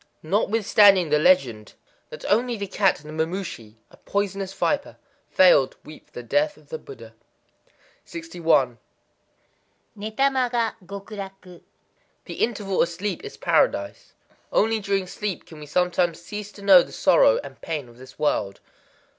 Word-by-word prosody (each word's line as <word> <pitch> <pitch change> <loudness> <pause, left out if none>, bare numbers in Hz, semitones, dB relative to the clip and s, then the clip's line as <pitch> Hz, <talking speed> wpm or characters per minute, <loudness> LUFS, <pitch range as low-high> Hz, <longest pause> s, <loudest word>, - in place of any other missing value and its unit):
Notwithstanding 200 -1 +4
the 150 - +4
legend 130 -11 +2 0.3
that 155 - -10
only 235 +3 +1
the 200 - -4
cat 195 -5 +1
and - - -11
the 155 - -8
mamushi 165 - -6 0.2
(a - - -18
poisonous 200 -1 -3
viper) 280 +9 -2 0.3
failed 180 -8 +5
to - - -31
weep 155 - -13
for - - -34
the 125 - -7
death 300 - 0
of - - -22
the 475 -1 -5
Buddha. 420 -2 -12 0.9
61.—Néta 175 - -3
ma 255 -2 +1
ga 235 -2 0
Gokuraku. 195 -2 -9 0.6
The - - -7
interval 205 -4 -1
of 170 - +2
sleep 185 +2 -4
is - - -9
Paradise. 100 0 0 0.4
Only 220 +1 +2
during 195 -2 -1
sleep 200 +1 -5
can 160 - -13
we 150 - -10
sometimes 175 +1 0
cease 205 +4 -7
to 200 - -13
know 190 -3 +8
the - - -8
sorrow - - +4
and - - -12
pain 150 -5 -4
of 120 +1 -18
this 130 0 -14
world. 105 -10 -1
195 Hz, 150 wpm, -24 LUFS, 155-210 Hz, 0.9 s, know